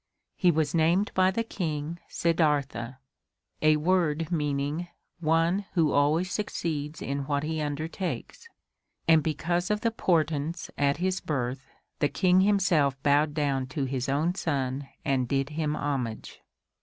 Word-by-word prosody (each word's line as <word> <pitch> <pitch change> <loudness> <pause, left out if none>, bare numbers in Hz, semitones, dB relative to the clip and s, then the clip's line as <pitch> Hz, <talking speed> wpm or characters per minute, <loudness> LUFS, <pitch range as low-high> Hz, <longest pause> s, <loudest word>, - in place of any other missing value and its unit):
He 180 - +3
was 155 -3 +1
named 170 +5 +2
by 185 0 +4
the 230 +5 -1
King, 165 -6 -4
"Siddartha," 145 -7 0 0.7
a 155 0 +5
word 165 -1 +1
meaning 150 +1 -1 0.3
one 165 +4 +2
who 160 -5 +3
always 155 +6 +2
succeeds 155 -7 -3
in 140 0 -3
what 145 -1 0
he 160 0 -2
undertakes 155 - -4 0.6
and 160 -1 +6
because 175 +4 -1
of 210 0 0
the 230 - +1
portents 165 -5 0
at 140 0 +1
his 185 +2 0
birth 130 -2 -3 0.3
the 145 - +2
King 185 +2 +3
himself 180 -9 +3
bowed 145 +1 +3
down 140 -4 0
to 135 +1 -2
his 130 +1 -2
own 155 +6 +1
son 135 -5 -2 0.2
and 130 -3 +1
did 135 +2 0
him 150 -1 -1
homage. 130 -7 -3
155 Hz, 140 wpm, -27 LUFS, 140-170 Hz, 0.7 s, and